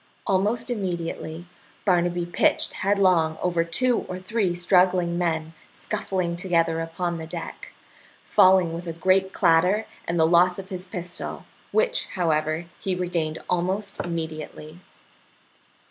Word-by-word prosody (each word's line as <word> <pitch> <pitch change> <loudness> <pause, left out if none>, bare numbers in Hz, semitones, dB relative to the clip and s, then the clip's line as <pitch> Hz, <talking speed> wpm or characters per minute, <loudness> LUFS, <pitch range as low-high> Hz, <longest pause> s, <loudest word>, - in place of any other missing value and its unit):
Almost 205 +6 +1
immediately 175 -5 -4 0.4
Barnaby 175 -2 +2
pitched 175 - +1
headlong 185 -5 +2
over 170 -2 +1
two 240 +9 +2
or 185 - -4
three 185 -1 -1
struggling 180 -1 +3
men 160 -2 -1 0.2
scuffling 185 -5 -2
together 165 -3 +1
upon 170 +1 -3
the 160 - -7
deck, 165 0 -7 0.5
falling 185 -3 +4
with 170 +1 -6
a 165 - -3
great 190 +3 +2
clatter 180 +7 +3 0.2
and 170 0 0
the 160 - +5
loss 175 +2 +4
of 195 0 -8
his 185 -1 -5
pistol, 180 -1 -6 0.3
which, - - +1
however, 155 -1 0
he 190 -2 -1
regained 170 -3 -2
almost 190 +3 -1
immediately. 160 -1 -6
175 Hz, 125 wpm, -25 LUFS, 165-190 Hz, 0.5 s, the